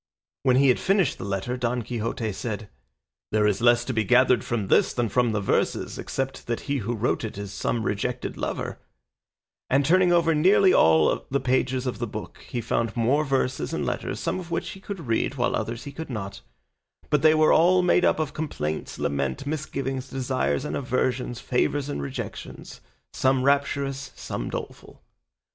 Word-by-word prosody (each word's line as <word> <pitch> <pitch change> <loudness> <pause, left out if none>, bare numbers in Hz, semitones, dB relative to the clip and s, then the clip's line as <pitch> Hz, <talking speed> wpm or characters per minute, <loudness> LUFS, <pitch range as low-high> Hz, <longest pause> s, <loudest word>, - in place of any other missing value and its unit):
When 130 -1 +3
he 135 +1 +5
had 125 - +3
finished 195 -6 +1
the - - -5
letter, 100 +5 -2
Don 120 0 -1
Quixote 115 -1 -3
said, 105 +1 -5 0.6
"There 105 0 +3
is 105 +1 +1
less 120 0 +4
to 130 - -2
be 110 -1 +1
gathered 125 +2 +4
from 110 -5 -2
this - - +3
than 120 -2 0
from 120 +2 +2
the 105 - 0
verses, 95 - 0
except 135 0 -4
that 115 -1 -2
he 140 0 -2
who 120 0 -2
wrote 115 +2 0
it 110 -3 -5
is 100 -1 -6
some 115 +2 -1
rejected 105 -3 -2
lover;" - - -4 0.9
and 135 +2 +3
turning 180 +3 +4
over 170 -1 +4
nearly 185 +4 +5
all 80 -1 +4
the 140 - +1
pages 130 0 0
of 125 - -3
the - - -2
book - - -7
he 120 - -2
found 115 +1 -1
more 130 +6 +2
verses 135 -2 -1
and - - -2
letters, - - -3
some - - -2
of 175 -2 -8
which 170 - -2
he 195 - -10
could 190 -4 -7
read, 115 +4 0
while 120 -2 0
others 115 +2 -3
he 140 - -7
could 160 +3 -7
not; 100 -5 -5 0.7
but 150 -2 +3
they 155 0 +6
were 155 0 +5
all 180 +3 +5
made 180 0 +3
up - - +3
of 155 -2 -2
complaints, 80 - -4
laments, 70 - -2
misgivings, 135 -3 -3
desires 130 +1 -1
and - - -3
aversions, 125 -2 -1
favours 140 +3 0
and 70 - -3
rejections, 70 -2 -7 0.3
some 130 -1 +2
rapturous, 140 -1 0
some - - -5
doleful. - - -8
125 Hz, 185 wpm, -25 LUFS, 115-140 Hz, 0.9 s, they